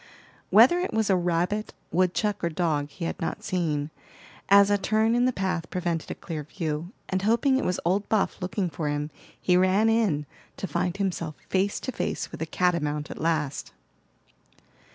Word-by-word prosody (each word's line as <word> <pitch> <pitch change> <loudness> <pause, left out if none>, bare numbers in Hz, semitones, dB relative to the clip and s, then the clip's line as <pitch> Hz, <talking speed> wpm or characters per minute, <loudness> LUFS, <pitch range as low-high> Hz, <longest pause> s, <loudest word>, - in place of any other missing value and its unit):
Whether 235 - +7
it 360 -9 -2
was 220 -2 +2
a - - +5
rabbit, 180 +4 0 0.2
woodchuck 185 +3 +1
or 170 - +2
dog, 155 -4 0
he 170 +3 -6
had - - -4
not 165 - -3
seen, 155 -5 -1 0.6
as 200 +1 +7
a 205 - +4
turn 220 +3 +2
in 245 +1 +3
the 255 - +3
path 185 -6 -2
prevented 170 -3 -2
a - - -4
clear 160 -3 -5
view; 155 +1 -4 0.2
and 190 0 -1
hoping 235 +6 +3
it 270 - -1
was 180 - 0
old 195 +4 +1
Buff 210 -2 +1
looking 185 +1 -1
for 155 -2 -3
him, 145 +1 -2 0.3
he 180 - +2
ran 185 +4 +4
in, 205 -10 +2 0.3
to - - -3
find 180 +1 -1
himself 170 -6 -2
face 195 +1 +1
to 260 - -3
face - - -3
with - - -8
a 160 - -2
catamount 150 -4 0
at - - -7
last. 155 -4 -1
180 Hz, 180 wpm, -26 LUFS, 165-205 Hz, 0.6 s, Whether